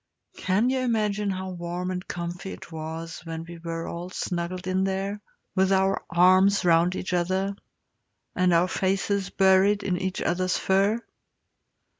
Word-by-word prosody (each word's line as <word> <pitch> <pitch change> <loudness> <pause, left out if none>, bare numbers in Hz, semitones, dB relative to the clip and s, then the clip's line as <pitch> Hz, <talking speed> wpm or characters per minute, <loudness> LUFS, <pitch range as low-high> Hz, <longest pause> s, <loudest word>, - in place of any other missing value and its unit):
Can 205 +7 +1
you 265 - 0
imagine 210 -4 0
how 190 0 -3
warm 175 +1 -4
and 180 0 -5
comfy 175 +2 -5
it - - -11
was 160 +1 -6
when 165 -1 -5
we 170 0 -9
were 165 0 -4
all 175 +1 -5
snuggled 180 -1 -3
in 185 +1 +1
there, 195 +2 -2 0.3
with 190 0 +2
our 190 0 +2
arms 185 +3 +5
round 170 +1 +4
each 185 - -4
other, 185 +3 0 0.8
and 185 0 +3
our 170 +1 +4
faces 195 +1 0
buried 195 +2 +4
in 180 -1 -1
each 190 0 -2
other's 185 +1 0
fur? 195 +4 +2
185 Hz, 150 wpm, -26 LUFS, 175-195 Hz, 0.8 s, arms